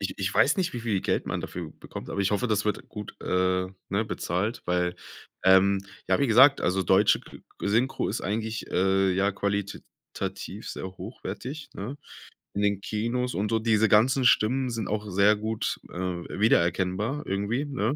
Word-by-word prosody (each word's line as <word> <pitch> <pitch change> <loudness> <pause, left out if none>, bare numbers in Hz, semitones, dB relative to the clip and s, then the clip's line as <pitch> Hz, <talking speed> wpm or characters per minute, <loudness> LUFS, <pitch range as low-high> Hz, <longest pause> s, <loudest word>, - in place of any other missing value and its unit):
Ich 100 - -3
ich 95 0 -1
weiß 150 - +4
nicht, 185 -2 0
wie 120 - -4
viel 110 -5 0
Geld - - -1
man - - -2
dafür 85 -3 -6
bekommt, - - -9
aber 100 - -2
ich 100 - +1
hoffe, 105 +4 +1
das 105 -2 0
wird 105 - -2
gut, 105 -1 -8
äh, 90 0 +1 0.2
ne, 100 +3 0
bezahlt, 105 +1 -2
weil, 90 0 0 0.5
ähm, 95 +1 +5 0.3
ja, - - +2
wie 140 - +3
gesagt, 130 +5 +7
also 95 +2 +1
deutsche 95 +4 +4
ge - - -14 0.3
Synchro 120 +6 +1
ist 110 - -2
eigentlich, 110 +2 -3
äh 95 +1 +2
ja, 100 +2 +1
qualitativ 100 0 -5
sehr - - -5
hochwertig, 130 - -7
ne, 120 +9 -5 0.6
in 100 - -2
den 100 -1 +1
Kinos 115 +5 -2
und 105 +2 -1
so 115 - +2
diese 110 -1 +3
ganzen 130 +5 +4
Stimmen 125 +3 +3
sind 115 -4 -3
auch 105 -1 -3
sehr 100 +3 +5
gut, 110 +1 -2
äh, 90 - -7 0.4
wiedererkennbar 100 - +1
irgendwie, 100 +8 -1
ne? 135 -2 -1
105 Hz, 175 wpm, -27 LUFS, 95-115 Hz, 0.6 s, gesagt